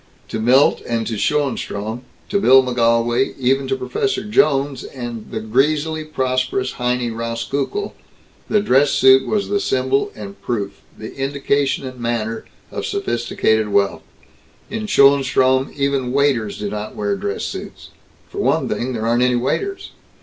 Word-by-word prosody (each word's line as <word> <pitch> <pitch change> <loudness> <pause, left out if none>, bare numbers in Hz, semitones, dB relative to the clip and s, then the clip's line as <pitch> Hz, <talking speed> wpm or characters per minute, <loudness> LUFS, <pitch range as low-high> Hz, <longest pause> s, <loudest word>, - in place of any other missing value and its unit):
To 110 - -3
Milt 125 +5 +4
and 115 -1 -1
to 115 - -3
Schoenstrom 115 -3 -1 0.3
to 200 - +1
Bill 130 -6 +7
McGolwey, 120 0 +1
even 135 +1 +1
to 135 - 0
Prof 130 +10 -1 0.2
Jones 140 -9 +2
and 120 -4 -7
the - - -4
greasily 150 +7 +1
prosperous 130 -3 -1
Heinie 125 -1 -1
Rauskukle 115 - -3 0.6
the 210 - +3
dress 145 -7 +3
suit 130 0 +5
was 210 -2 0
the 205 0 0
symbol 130 -3 0
and 100 -2 -9
proof, 100 -4 -3 0.2
the 110 - -8
indication 140 0 0
and 130 -1 -8
manner, 115 -1 -2 0.3
of - - -4
sophisticated 110 -2 0
wealth. 100 -1 +1 0.7
In 215 0 -3
Schoenstrom 135 -4 +4
even 140 -3 0
waiters 130 -6 +1
do 105 -1 -4
not 105 0 -5
wear 100 -1 -1
dress 100 0 -3
suits. - - -7 0.4
For - - -8
one - - +1
thing 130 +2 -2
there 110 -2 -3
aren't 120 +1 +2
any 125 0 +3
waiters. 390 - -2
130 Hz, 145 wpm, -19 LUFS, 115-140 Hz, 0.7 s, Bill